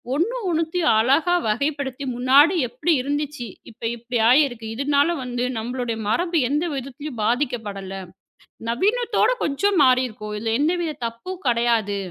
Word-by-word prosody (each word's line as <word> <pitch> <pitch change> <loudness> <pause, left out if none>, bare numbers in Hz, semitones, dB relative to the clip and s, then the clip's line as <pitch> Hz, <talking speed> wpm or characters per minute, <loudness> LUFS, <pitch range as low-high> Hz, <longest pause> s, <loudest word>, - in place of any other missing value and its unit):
ஒண்ணு 395 - 0
ஒண்ணுத்தையும் 330 0 +1
அழகாக 305 +9 +3
வகைப்படுத்தி 280 +3 -2
முன்னாடி 275 +8 +5
எப்படி 255 +8 -1
இருந்துச்சு, 285 -2 -3 0.2
இப்போ 225 0 -10
இப்படி 240 +1 -4
ஆகியிருக்கு, 245 -3 +3
இதனால் 285 +5 +2
வந்து 245 -1 -3
நம்முடைய 235 0 -3
மரபு 335 - +1
எந்த 295 +4 0
விதத்திலும் 275 0 -6
பாதிக்கப்படவில்லை. 210 -6 -2 0.7
நவீனத்தோடே 450 - +2
கொஞ்சம் 390 +8 +1
மாறி 255 0 +4
இருக்கோம். 210 -2 -8
இதில் 225 +1 -1
எந்த 320 +5 +2
வித 325 -3 -2
தப்பும் 350 +12 -6
கிடையாது. 230 -4 +1
265 Hz, 130 wpm, -22 LUFS, 235-310 Hz, 0.7 s, முன்னாடி